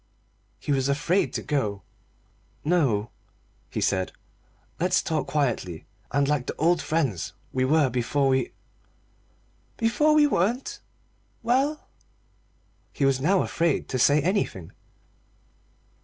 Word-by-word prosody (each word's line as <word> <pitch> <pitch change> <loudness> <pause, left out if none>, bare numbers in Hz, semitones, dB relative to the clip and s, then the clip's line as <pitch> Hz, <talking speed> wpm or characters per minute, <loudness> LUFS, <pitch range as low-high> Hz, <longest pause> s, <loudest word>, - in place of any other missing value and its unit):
He - - -4
was 135 -1 +1
afraid 165 +7 +1
to - - -3
go. 105 - -1 0.8
"No," 135 -11 +1 0.6
he - - -4
said, 95 -2 0 0.7
"let's 180 +1 +2
talk 160 -3 -1
quietly, 115 - -1 0.3
and 140 +1 +2
like 145 -4 0
the - - -3
old 165 +1 +2
friends 120 - -1 0.2
we 130 0 +1
were 150 +1 +4
before 125 +3 0
we 130 -2 +1 0.6
" - - -38
"Before 300 +7 +3
we 300 -1 +6
weren't. 240 0 0 0.6
Well?" 270 +6 +1 1.0
He 140 - 0
was 135 -1 +2
now 185 +6 +3
afraid 165 -3 0
to 130 - -1
say 145 +5 +5
anything. 170 - -1
145 Hz, 120 wpm, -26 LUFS, 130-180 Hz, 1.0 s, we